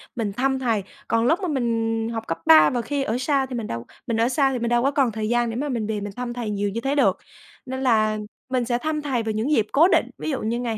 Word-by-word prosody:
mình 215 -4 -2
thăm 265 +4 0
thầy, 230 -6 0 0.2
còn 230 0 +1
lúc 325 +9 +3
mà 370 - -1
mình 225 -5 -1
học 225 0 -5
cấp 165 - -2
3 155 -1 +8
và 245 - -1
khi 280 +4 -2
ở 230 -2 -1
sa 270 +1 +1
thì 255 -1 -6
mình 230 -3 -3
đâu 115 0 -5 0.2
mình 230 -2 0
ở 230 +2 +2
xa 270 +1 +2
thì 255 - -2
mình 235 0 -1
đâu 240 0 +2
có 275 - +2
còn 275 -4 +2
thời 215 0 -3
gian 240 0 +1
để 225 - -4
mà 285 +4 -2
mình 230 -5 -2
về 215 -2 -2
mình 205 0 -6
thăm 245 -1 -3
thầy 240 -3 -4
nhiều 205 0 -1
như 225 +4 -4
thế 275 +2 0
được. 285 - +3 0.5
Nên 260 0 -5
là 215 -4 +3 0.3
mình 255 -2 0
sẽ 240 0 0
thăm 305 +3 -2
thầy 265 -6 -1
vào 220 - -2
những 220 +7 -1
dịp 220 -8 +2
cố 320 +5 +6
định. - - +2
Ví - - -4
dụ 275 - -2
như 230 +2 -1
ngày 235 -3 -2
240 Hz, 295 wpm, -23 LUFS, 220-265 Hz, 0.5 s, 3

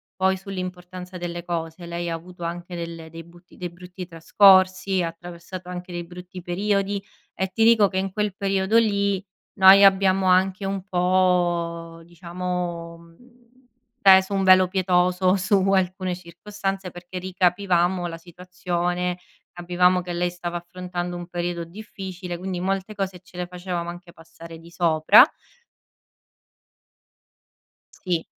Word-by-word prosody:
poi 190 0 +2
sull'importanza 185 -1 -7
delle 175 -1 -5
cose. 165 0 -4
Lei 170 0 -4
ha - - -2
avuto 175 +1 -11
anche 175 +1 -5
delle 165 -1 -7
dei 165 0 -10
butti 175 +2 -19
dei 180 -1 -5
brutti 180 +1 -10
trascorsi, 185 +2 +4
ha 170 - -1
attraversato 175 +2 -9
anche 180 0 -7
dei 175 0 -4
brutti 180 +1 -10
periodi, 200 +2 -1 0.3
e 190 - -2
ti 225 - +2
dico 225 -3 +6
che 190 - -5
in 190 0 -1
quel 210 -2 -2
periodo 195 +2 +1
lì 200 -3 +1 0.3
noi 195 0 +8
abbiamo 190 -1 +4
anche 185 +1 +2
un 195 -1 -3
po' 175 -3 0
diciamo, 175 0 -5
mhmm, 235 +9 -21 0.5
peso 190 -1 +6
un 195 - +1
velo 185 0 +6
pietoso 185 0 +2
su 190 +2 +1 0.2
alcune 185 -1 0
circostanze 195 +2 -5
perché 175 +1 -8
ricapivamo 180 -1 +1
la 165 -1 -7
situazione, 180 0 -3 0.3
capivamo 180 +1 +2
che 175 0 -6
lei 175 +1 0
stava 175 0 -5
affrontando 175 0 -6
un 175 0 -8
periodo 175 -1 -3
difficile, 185 -2 -8
quindi 185 0 -4
molte 195 +2 -2
cose 190 -2 -4
ce 185 - -21
le 180 - -2
facevamo 180 -1 -5
anche 175 0 -10
passare 165 +1 -13
di 165 +1 -15
sopra. 160 -3 +6 2.7
Sì. 175 -3 -2
180 Hz, 135 wpm, -23 LUFS, 175-190 Hz, 2.7 s, noi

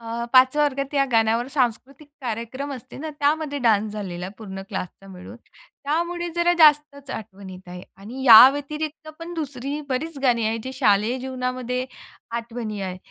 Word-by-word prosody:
अ, 230 +1 -5
5 260 +2 +6
वर्गात 280 -2 0
या 275 -1 +3
गाण्यावर 225 +1 +2
सांस्कृतिक 270 +2 -2
कार्यक्रम 245 +4 -4
असते 255 -1 -10
ना 310 +2 -5
त्यामध्ये 290 0 0
डान्स 215 -2 +2
झालेला 185 -4 -5
पूर्ण 195 -3 -8
क्लासचा 190 0 -6
मिळून. 185 +4 -11
त्यामुळे 345 +4 -4
जरा 345 0 +3
जास्तचं 295 -3 +4
आठवण 195 -2 -9
येत 185 0 -12
आहे. 180 0 -9
आणि 230 +7 -9
या 235 0 +11
व्यतिरिक्त 300 +2 -6
पण 335 +1 -8
दुसरी 285 -2 -4
बरीचं 280 +2 -4
गाणी 240 -4 +2
आहेत 225 +1 -1
जे 260 - -5
शालेय 215 0 +2
जीवनामध्ये 255 -1 -3 0.5
आठवणी 230 -3 -6
आहे. 185 -1 -4
255 Hz, 155 wpm, -23 LUFS, 220-285 Hz, 0.5 s, या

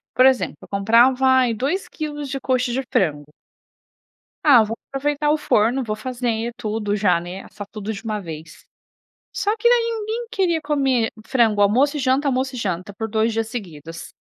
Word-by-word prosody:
por 255 - +6
exemplo? 265 -1 +3
Eu - - -12
comprava, 235 +6 +4
ai, 260 -2 +4
2 280 - -2
quilos 295 -2 -5
de 275 - -3
coxa 255 -1 0
de 265 - 0
frango 150 -5 0 1.1
ah, 270 -7 +7
vou 220 +1 -3 0.2
aproveitar 295 +2 0
o 305 - +3
forno, 245 -3 +1
vou 215 -2 -3
fazer 235 0 -3
tudo 215 -3 -2
já, 195 -4 +2
né, 180 +3 -7
assar 205 - -9
tudo 215 0 -5
de 205 - -8
uma 215 -2 -2
vez. 160 -3 -10 0.7
Só 415 +1 -1
que 475 +2 +3
daí, 470 -1 +3
ninguém 445 +3 -4
queria 360 -7 +1
comer 270 -6 +1
frango, 225 -5 +2
almoço 260 +9 +3
e - - -3
janta, 265 +2 +1
almoço 265 0 -1
e - - -6
janta, 190 -3 -3
por 220 +2 -4
2 220 +1 +1
dias 225 0 -1
seguidos. 165 - -8
240 Hz, 180 wpm, -21 LUFS, 210-275 Hz, 1.1 s, ah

